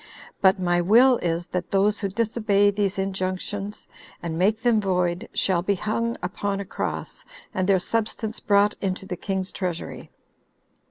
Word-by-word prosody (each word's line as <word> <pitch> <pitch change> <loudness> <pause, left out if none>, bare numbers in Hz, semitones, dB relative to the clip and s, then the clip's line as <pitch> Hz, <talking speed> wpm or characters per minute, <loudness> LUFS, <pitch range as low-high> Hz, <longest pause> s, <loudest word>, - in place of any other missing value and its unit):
But 190 +1 +5
my 175 -1 +1
will 240 +8 +6
is, 170 0 -1
that 180 0 -4
those 205 +2 +2
who 200 - -1
disobey 210 -1 +2
these 200 -1 -1
injunctions, 195 +1 -3 0.4
and 165 -2 -3
make 210 +6 +1
them 235 -3 +3
void, 180 0 0
shall 180 -3 +2
be 200 +3 +1
hung 230 +4 -2
upon 195 +2 -2
a 200 - -4
cross, - - -5 0.3
and 185 +1 0
their 195 - +5
substance 220 +3 -2
brought 205 0 +3
into 195 -1 -2
the 190 -2 -4
king's 190 +1 -3
treasury." 180 -3 -5
195 Hz, 155 wpm, -24 LUFS, 185-210 Hz, 0.4 s, will